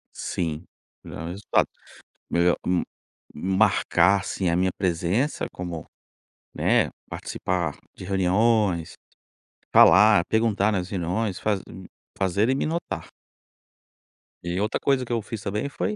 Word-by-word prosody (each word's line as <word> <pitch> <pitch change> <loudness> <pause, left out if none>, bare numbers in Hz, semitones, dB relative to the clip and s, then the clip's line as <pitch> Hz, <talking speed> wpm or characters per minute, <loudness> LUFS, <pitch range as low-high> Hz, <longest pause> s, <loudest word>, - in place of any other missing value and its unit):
Sim, 80 -1 -3 0.4
melhorar 85 - -7
o - - -5
resultado, 100 +3 +1 0.6
melhor 85 0 +2
hum, 90 -1 +2 0.5
marcar, 95 0 +3
assim, 95 -2 -2
a 85 - +1
minha 95 0 +2
presença 95 - 0
como, 85 -3 -6 0.7
né, - - +2 0.2
participar 90 -5 -3 0.2
de - - -9
reuniões, 95 -1 +1 0.8
falar, 105 -3 +7
perguntar 110 -2 +1
nas 95 -3 -2
reuniões, 95 +2 -2
faz 105 -3 0
hum, 95 - -10 0.3
fazerem 100 +7 +1
me - - -1
notar. 165 +2 -4 1.3
E 85 +1 -3
outra 105 +2 -1
coisa 135 -2 +1
que 120 - -9
eu 115 - 0
fiz 110 0 -7
também 105 +8 -3
foi 210 - -2
95 Hz, 125 wpm, -25 LUFS, 90-110 Hz, 1.3 s, falar